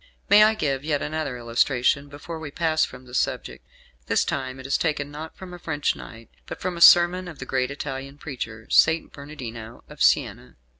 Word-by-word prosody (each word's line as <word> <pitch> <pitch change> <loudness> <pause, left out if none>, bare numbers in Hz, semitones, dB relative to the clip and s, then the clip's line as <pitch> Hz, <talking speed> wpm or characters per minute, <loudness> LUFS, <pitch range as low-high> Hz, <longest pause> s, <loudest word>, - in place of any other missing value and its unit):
May 205 +1 +8
I 220 +1 +4
give 140 -8 -1
yet 150 -2 -1
another 150 -4 -3
illustration 125 +4 +1
before 155 +3 -8
we 160 -2 -6
pass 160 +1 +1
from 125 0 -6
the 125 - -15
subject. - - -2 0.4
This - - +2
time 130 -1 -3
it 130 - -10
is 135 - 0
taken 145 -3 -1
not 155 +2 -8
from 185 -1 -10
a 175 - -9
French 150 -4 -1
knight, 115 0 -12 0.2
but - - -7
from 180 -1 -3
a 170 - -7
sermon 175 +2 +7
of 165 -4 -9
the 135 - -7
great 130 -1 -1
Italian 140 -1 -6
preacher, 115 -7 -7
St. 160 +1 +4
Bernardino 120 -6 -9
of - - -13
Siena. - - +1
145 Hz, 195 wpm, -24 LUFS, 130-160 Hz, 0.4 s, May